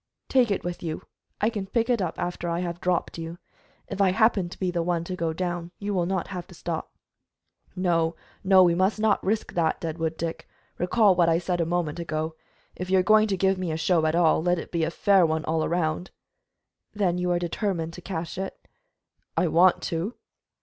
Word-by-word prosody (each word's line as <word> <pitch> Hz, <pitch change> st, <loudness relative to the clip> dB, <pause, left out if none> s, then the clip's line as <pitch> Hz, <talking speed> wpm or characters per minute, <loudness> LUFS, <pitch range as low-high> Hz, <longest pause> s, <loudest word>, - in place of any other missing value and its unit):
"Take 255 Hz, -3 st, +4 dB
it 200 Hz, -, -1 dB
with 175 Hz, 0 st, -4 dB
you; 160 Hz, -2 st, -4 dB, 0.4 s
I 215 Hz, +3 st, +2 dB
can 205 Hz, -4 st, -4 dB
pick 230 Hz, +3 st, 0 dB
it 240 Hz, -4 st, +1 dB
up 175 Hz, -3 st, -2 dB
after 175 Hz, -1 st, -3 dB
I 170 Hz, +1 st, -1 dB
have 175 Hz, -1 st, -4 dB
dropped 180 Hz, -1 st, -1 dB
you. 165 Hz, +1 st, -6 dB, 0.5 s
If 200 Hz, 0 st, -3 dB
I 195 Hz, -, +5 dB
happen 205 Hz, -2 st, +2 dB
to -, -, -10 dB
be 185 Hz, -2 st, 0 dB
the 175 Hz, -1 st, -1 dB
one 170 Hz, -1 st, 0 dB
to 180 Hz, +2 st, -5 dB
go 165 Hz, -2 st, -1 dB
down, 175 Hz, 0 st, -3 dB
you 205 Hz, 0 st, -3 dB
will 175 Hz, -3 st, +1 dB
not 185 Hz, -1 st, -2 dB
have 180 Hz, -3 st, -6 dB
to -, -, -14 dB
stop." -, -, -5 dB, 0.8 s
"No, 170 Hz, -3 st, +1 dB, 0.3 s
no, 190 Hz, -1 st, +7 dB
we 175 Hz, -1 st, +4 dB
must 190 Hz, +5 st, +1 dB
not 215 Hz, -1 st, +2 dB
risk 215 Hz, +3 st, -1 dB
that, 165 Hz, -2 st, +1 dB
Deadwood 160 Hz, -1 st, -3 dB
Dick. 165 Hz, 0 st, -5 dB, 0.3 s
Recall 195 Hz, +3 st, +4 dB
what 170 Hz, -1 st, +4 dB
I 165 Hz, -, +4 dB
said 175 Hz, 0 st, -1 dB
a 165 Hz, -, 0 dB
moment 170 Hz, -2 st, -1 dB
ago. 160 Hz, -1 st, -3 dB, 0.4 s
If 180 Hz, 0 st, -5 dB
you 190 Hz, -, +4 dB
are 185 Hz, -, +4 dB
going 215 Hz, +2 st, +5 dB
to 195 Hz, -2 st, -1 dB
give 190 Hz, 0 st, +2 dB
me 180 Hz, -3 st, -2 dB
a 155 Hz, -, -2 dB
show 165 Hz, 0 st, +2 dB
at 155 Hz, -, +1 dB
all, 170 Hz, -2 st, +4 dB
let 175 Hz, +1 st, +2 dB
it -, -, -7 dB
be 170 Hz, -2 st, 0 dB
a 160 Hz, -, +1 dB
fair 195 Hz, +2 st, +4 dB
one 160 Hz, -1 st, 0 dB
all 160 Hz, 0 st, 0 dB
around." 170 Hz, +1 st, -1 dB, 0.8 s
"Then 185 Hz, -4 st, 0 dB
you 180 Hz, 0 st, 0 dB
are 175 Hz, -, +2 dB
determined 175 Hz, -1 st, -2 dB
to 180 Hz, -, -9 dB
cache 170 Hz, -1 st, -5 dB
it?" 190 Hz, -, -4 dB, 0.8 s
"I -, -, +3 dB
want 180 Hz, +3 st, +4 dB
to." 175 Hz, +8 st, -2 dB
175 Hz, 220 wpm, -26 LUFS, 165-190 Hz, 0.8 s, no